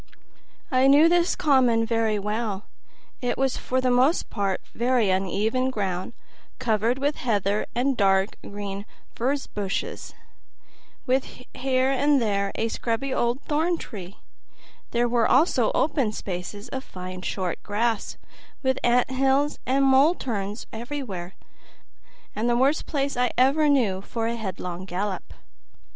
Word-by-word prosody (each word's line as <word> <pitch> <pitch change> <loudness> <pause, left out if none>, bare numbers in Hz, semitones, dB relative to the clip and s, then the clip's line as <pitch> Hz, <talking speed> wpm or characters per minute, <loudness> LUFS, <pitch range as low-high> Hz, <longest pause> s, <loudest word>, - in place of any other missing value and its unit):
I 260 0 +4
knew 290 +4 +7
this 345 +1 +3
common 250 -6 +3
very 225 -2 +1
well; 210 0 -2 0.6
it 245 -1 -1
was 265 -1 +1
for 255 - -1
the 255 -1 +1
most 260 +7 +2
part 195 -3 -1
very 240 -4 +2
uneven 210 +7 0
ground, 195 -4 -3 0.4
covered 230 0 +1
with 285 +2 0
heather 205 -3 0
and 260 +3 +1
dark 195 -2 +2
green 200 0 -6 0.3
furze 270 +4 -1
bushes, 200 -2 -4 0.9
with 260 -1 -1
here 260 0 +1
and 280 +1 +3
there 200 -3 0
a 225 - -1
scrubby 240 +4 -2
old 240 +3 0
thorn 320 +3 +1
tree; 195 - -9 0.7
there 240 0 +1
were 235 -1 +2
also 295 +7 +3
open 270 -8 +1
spaces 200 +4 -6
of 265 -1 -4
fine 185 -3 -8
short 185 -1 -3
grass, 220 +1 -1 0.5
with 260 0 +1
ant 245 +1 +3
hills 270 +2 +1
and 270 +2 +3
mole 270 +6 +5
turns 205 - -4
everywhere; 225 -7 -5 1.0
the 235 +3 +1
worst 275 +5 +2
place 280 -2 -1
I 245 0 +2
ever 280 +4 +4
knew 220 -10 +2
for 225 +3 -4
a 230 +1 -1
headlong 185 -4 -5
gallop. 190 +1 -4
240 Hz, 135 wpm, -25 LUFS, 205-265 Hz, 1.0 s, knew